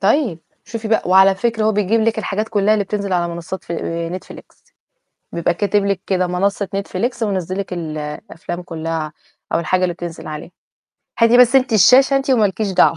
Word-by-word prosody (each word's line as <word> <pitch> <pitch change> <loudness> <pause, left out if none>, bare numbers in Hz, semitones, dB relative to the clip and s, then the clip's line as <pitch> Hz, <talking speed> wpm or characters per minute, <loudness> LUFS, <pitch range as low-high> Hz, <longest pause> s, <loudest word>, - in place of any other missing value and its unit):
طيب، 215 - +1 0.3
شوفي 225 -1 -6
بقى، 220 - +2
وعلى 190 +1 +6
فكرة 225 +1 -1
هو 220 - +3
بيجيب 210 +2 +1
لِك 220 0 +1
الحاجات 215 +1 -2
كُلّها 210 0 +2
اللي 205 -2 0
بتنزل 200 -1 -3
على 175 -1 +1
منصات 170 +2 -7
فل 170 - -5
آآ، 170 +2 -4
Netflix. - - -16 0.6
بيبقى 170 0 0
كاتب 205 +2 0
لِك 195 -2 -1
كده 185 -2 +1
منصة 195 +2 -1
Netflix 230 +5 -3
ومنِّزل 185 -2 -2
لِك 190 -2 -4
الأفلام 155 +1 -6
كُلّها 165 -2 -4 0.4
أو - - +3
الحاجة 185 +2 0
اللي 175 -1 +1
بتنزل 170 -2 -7
عليها، 155 +3 -7 0.7
هاتي 230 +1 +5
بس 250 +1 +6
أنتِ 255 -3 +2
الشاشة 260 +6 +6
أنتِ 270 0 -1
وما 230 -5 +4
لكيش 200 +1 -2
دعوة. 165 - +4
195 Hz, 185 wpm, -19 LUFS, 175-220 Hz, 0.7 s, وعلى